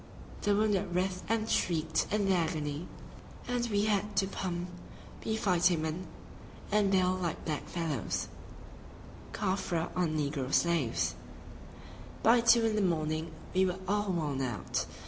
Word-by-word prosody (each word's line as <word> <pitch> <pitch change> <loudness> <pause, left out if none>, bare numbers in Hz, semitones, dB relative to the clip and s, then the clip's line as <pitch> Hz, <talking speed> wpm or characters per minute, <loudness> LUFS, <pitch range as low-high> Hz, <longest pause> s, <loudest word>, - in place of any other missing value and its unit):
The 205 -1 +2
wounded 200 -4 +1
writhed 185 0 -1
and 220 -1 +1
shrieked 160 -6 +1
in 205 -1 +1
their 190 -2 +3
agony, 155 -1 -2 0.6
and 245 -1 0
we 205 -1 +2
had 210 0 0
to 195 - +3
pump, 180 -2 -3 0.5
we 220 - 0
fighting 180 -5 +3
men, 160 +4 -3 0.6
and 205 -1 +3
bale 185 -1 +3
like 180 -3 -3
black 155 -2 -2
fellows 160 - -2 1.0
[Caffre 185 -4 -1
or 180 -1 +2
negro 145 -3 -2
slaves]! 115 - +2 1.1
By 235 +1 +6
two 230 0 +6
in 220 -1 +1
the 210 - +2
morning 160 -3 0 0.2
we 190 0 +4
were 180 0 -2
all 205 0 +1
worn 150 -6 -1
out. 120 -8 -2
180 Hz, 140 wpm, -31 LUFS, 160-205 Hz, 1.1 s, By